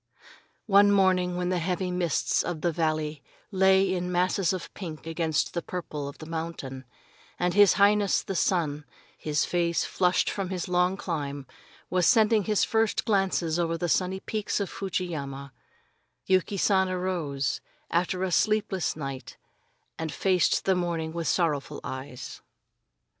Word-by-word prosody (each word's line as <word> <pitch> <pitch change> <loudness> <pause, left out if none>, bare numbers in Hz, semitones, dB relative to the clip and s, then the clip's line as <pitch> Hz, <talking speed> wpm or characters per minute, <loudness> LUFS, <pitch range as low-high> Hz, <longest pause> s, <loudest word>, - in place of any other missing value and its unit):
One 205 -1 +6
morning, 185 -2 +3
when 180 0 -1
the 180 -1 0
heavy 180 +2 -1
mists 180 -3 +1
of 170 -3 -4
the 175 - +1
valley 155 -2 -1 0.3
lay 190 0 +4
in 180 0 -2
masses 180 0 +1
of 185 -2 -5
pink 160 -6 -7
against 165 -1 -1
the 170 - -2
deeper 180 - -4
purple 145 -3 -5
of 140 - -8
the 155 - -9
mountain, 160 -5 -5 0.5
and 175 0 0
his 205 -2 +6
Highness, 205 0 +3
the 195 - -4
sun, 160 -5 0 0.3
his 150 -1 -1
face 170 -1 0
flushed 180 0 +1
from 195 -3 -2
his 185 -3 -3
long 180 +1 +2
climb, 145 -7 -4 0.5
was 180 -1 +3
sending 220 -3 +4
his 210 -2 +2
first 225 -1 +1
glances 185 -5 +1
over 165 -1 0
the 175 - -2
sunny 185 +2 0
peaks 215 -1 -2
of 200 - -3
Fuji 190 -2 -2
yama, 140 -5 -6 0.7
Yuki 190 +1 +1
San 190 -1 +3
arose, 175 -8 -2 0.3
after 180 +2 0
a 190 - -1
sleepless 205 0 +1
night, 135 -3 -7 0.6
and 160 -1 -3
faced 185 0 +1
the 190 - +4
morning 170 -3 -2
with 165 -2 -3
sorrowful 150 -4 0
eyes. 130 -1 -7
180 Hz, 155 wpm, -27 LUFS, 160-190 Hz, 0.7 s, One